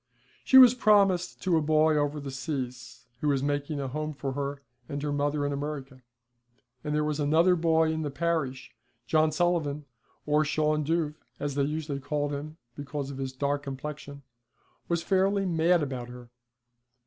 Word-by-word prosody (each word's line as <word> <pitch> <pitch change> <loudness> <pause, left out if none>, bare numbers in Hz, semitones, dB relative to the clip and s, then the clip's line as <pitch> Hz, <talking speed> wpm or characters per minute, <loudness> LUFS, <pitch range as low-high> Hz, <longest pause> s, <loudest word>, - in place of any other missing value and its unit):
She 265 - +6
was 250 -2 +10
promised 200 -6 +2
to 180 -3 +3
a - - +2
boy 155 +1 +3
over 145 0 0
the 140 -1 -6
seas, 125 -4 -5
who 150 - -2
was 140 -2 +1
making 145 +1 -2
a 135 - -3
home 155 +3 -4
for 135 -1 -4
her 140 +1 -4 0.3
and 140 - -3
her 150 - -1
mother 145 0 0
in 145 - -1
America, 140 -2 -5 0.8
and 150 0 -2
there 150 - +1
was 150 0 -2
another 160 +5 +4
boy 160 -1 +2
in 160 0 -2
the 150 - -2
parish, 140 -5 -2 0.3
John 155 +5 +3
Sullivan, 155 -4 0 0.4
or 150 +1 +3
Shawn 155 0 +1
Dhuv, 160 0 0 0.3
as 145 -1 -2
they 140 - 0
usually 150 -1 -3
called 145 +1 -2
him 150 +2 -6 0.2
because 140 -1 -5
of 135 - -8
his 135 -1 -3
dark 140 +2 -1
complexion, 140 +1 -7 0.6
was 170 -1 -1
fairly 195 +1 +2
mad 170 -1 +2
about 130 -3 -5
her. 125 -1 -12
150 Hz, 170 wpm, -28 LUFS, 140-160 Hz, 0.8 s, was